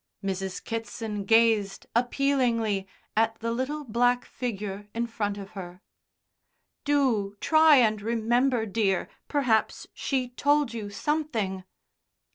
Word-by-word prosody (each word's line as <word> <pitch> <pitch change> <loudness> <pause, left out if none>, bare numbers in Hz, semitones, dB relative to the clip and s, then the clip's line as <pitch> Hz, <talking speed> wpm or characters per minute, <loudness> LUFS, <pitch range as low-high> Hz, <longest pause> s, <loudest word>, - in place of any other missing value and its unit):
Mrs. 190 -1 -3
Kitson 225 -2 -4
gazed 225 -2 +3
appealingly 235 -5 +1 0.3
at 225 +1 +2
the 230 +1 -3
little 265 +5 -2
black 245 0 +1
figure 205 -4 -5
in 235 +1 0
front 210 -3 -3
of 200 0 -8
her. 180 -1 -9 1.0
"Do 240 -9 +1
try 315 -1 +6
and 220 -5 +3
remember, 235 +2 +1
dear. 200 -3 0 0.2
Perhaps 255 -7 +1
she 260 -3 -1
told 285 0 +1
you 215 -3 -5
something." 220 -8 -2
225 Hz, 110 wpm, -27 LUFS, 205-255 Hz, 1.0 s, try